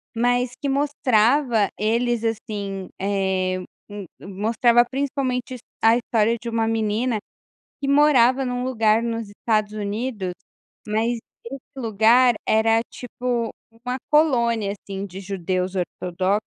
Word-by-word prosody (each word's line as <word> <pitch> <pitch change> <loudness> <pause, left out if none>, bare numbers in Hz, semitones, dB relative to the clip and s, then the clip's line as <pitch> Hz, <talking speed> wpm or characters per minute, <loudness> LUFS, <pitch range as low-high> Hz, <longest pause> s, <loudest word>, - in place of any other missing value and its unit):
Mas 245 +1 +1
que 285 - -3
mostrava 255 -4 +2
eles, 230 +2 0
assim, 205 -4 -4
eh, 190 -1 0
m 185 - -5 0.2
m 205 -3 -7
mostrava 225 +5 +2
principalmente 260 -2 -2
his 250 - -7 0.2
a 225 +1 +6
história 230 -1 +1
de 235 - -4
uma 225 -1 0
menina 225 +1 0 0.6
que 275 - -1
morava 270 -3 +4
num 250 0 -2
lugar 225 -3 +2
nos 230 -2 -3
Estados 215 0 -1
Unidos, 210 -2 -3 0.5
mas 225 +3 0 0.3
esse 265 +3 -7 0.2
lugar 235 +1 +4
era 225 +1 +4
tipo 245 -1 -3 0.3
uma 250 +1 -2
colônia, 235 -9 +2
assim, 195 -1 -7
de 190 +1 -9
judeus 185 -1 -2
ortodoxos, 185 +3 -1
225 Hz, 125 wpm, -23 LUFS, 205-245 Hz, 0.6 s, a